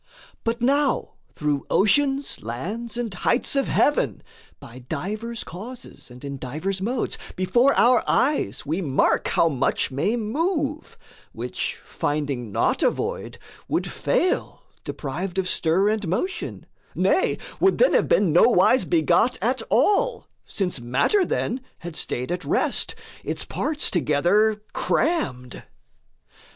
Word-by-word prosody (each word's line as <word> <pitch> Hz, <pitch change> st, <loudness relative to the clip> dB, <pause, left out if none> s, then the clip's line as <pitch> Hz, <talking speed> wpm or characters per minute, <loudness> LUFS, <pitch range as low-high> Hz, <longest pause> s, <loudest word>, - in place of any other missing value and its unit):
But 230 Hz, +1 st, -2 dB
now 280 Hz, +2 st, +1 dB, 0.2 s
through 145 Hz, -2 st, -1 dB
oceans, 275 Hz, +7 st, +2 dB
lands, 205 Hz, -, -5 dB
and 235 Hz, -5 st, -3 dB
heights 235 Hz, +9 st, +1 dB
of 275 Hz, -, +1 dB
heaven, 295 Hz, -, +1 dB, 0.4 s
By 130 Hz, -3 st, -11 dB
divers 210 Hz, -, -4 dB
causes 230 Hz, -, -10 dB
and 125 Hz, +3 st, -11 dB
in 140 Hz, -1 st, -6 dB
divers 155 Hz, +10 st, -3 dB
modes, 235 Hz, +5 st, -2 dB, 0.2 s
Before 240 Hz, +9 st, +3 dB
our 245 Hz, 0 st, +5 dB
eyes 290 Hz, -, +1 dB
we 160 Hz, +6 st, -1 dB
mark 140 Hz, -6 st, +1 dB
how 165 Hz, -, +3 dB
much 135 Hz, -3 st, 0 dB
may 145 Hz, -, 0 dB
move, 300 Hz, -, -2 dB, 0.4 s
Which, -, -, -4 dB
finding 140 Hz, -6 st, -2 dB
not -, -, +1 dB
a -, -, +5 dB
void, -, -, -4 dB, 0.3 s
would -, -, 0 dB
fail -, -, 0 dB, 0.2 s
deprived 175 Hz, +7 st, -5 dB
Of 190 Hz, -1 st, 0 dB
stir 185 Hz, +4 st, +2 dB
and 215 Hz, -3 st, -1 dB
motion; 365 Hz, -, -3 dB, 0.3 s
nay, -, -, +2 dB, 0.2 s
would 385 Hz, -, +3 dB
then -, -, +4 dB
have -, -, +3 dB
been 190 Hz, -7 st, +3 dB
Nowise 215 Hz, +6 st, +5 dB
begot 335 Hz, -2 st, +2 dB
at -, -, 0 dB
all, -, -, +2 dB, 0.2 s
since 180 Hz, -8 st, -2 dB
matter, 135 Hz, -, +2 dB
then, 260 Hz, -6 st, -2 dB, 0.2 s
Had 175 Hz, -1 st, -8 dB
staid 125 Hz, -2 st, -3 dB
at 180 Hz, 0 st, -3 dB
rest, -, -, 0 dB, 0.3 s
its -, -, -3 dB
parts 300 Hz, -1 st, 0 dB
together 185 Hz, +8 st, +2 dB
crammed. 170 Hz, -, -1 dB
195 Hz, 130 wpm, -24 LUFS, -, 0.4 s, our